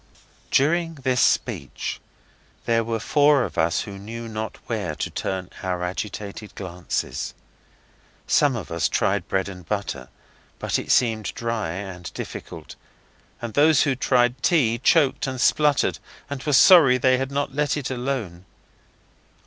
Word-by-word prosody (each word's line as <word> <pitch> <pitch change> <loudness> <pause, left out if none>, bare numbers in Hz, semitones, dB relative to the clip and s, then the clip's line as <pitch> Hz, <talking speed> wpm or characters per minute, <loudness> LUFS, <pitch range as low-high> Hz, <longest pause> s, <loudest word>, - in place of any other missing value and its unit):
During 165 +4 +2
this 130 -3 0
speech 70 - -1 0.6
there 115 0 +2
were 115 0 -2
four 145 +3 +4
of - - -5
us 80 +1 +1
who 100 -2 -8
knew 115 +3 -7
not 110 -1 -5
where - - -3
to - - -3
turn 95 -1 -4
our 90 -1 -2
agitated 100 +2 -5
glances. 90 -2 -4 0.9
Some 145 -3 +3
of 105 -6 -6
us 85 -1 0
tried - - 0
bread 95 0 0
and 90 -2 -9
butter, 80 -9 -4 0.5
but - - -1
it - - -3
seemed 110 -4 +2
dry 115 -6 -2
and 90 -2 -7
difficult, - - -8 0.7
and 115 -2 -4
those 150 -1 +5
who 140 -2 +1
tried 125 -1 +1
tea 120 -10 +2
choked 145 -2 +3
and 130 -1 -4
spluttered 145 0 +2 0.3
and 140 -2 -4
were 150 - -1
sorry 140 -3 +7
they 130 0 +3
had 135 +1 -3
not 140 -1 -2
let 150 +1 0
it 135 -2 -4
alone. 120 -9 -4
115 Hz, 145 wpm, -23 LUFS, 95-140 Hz, 0.9 s, sorry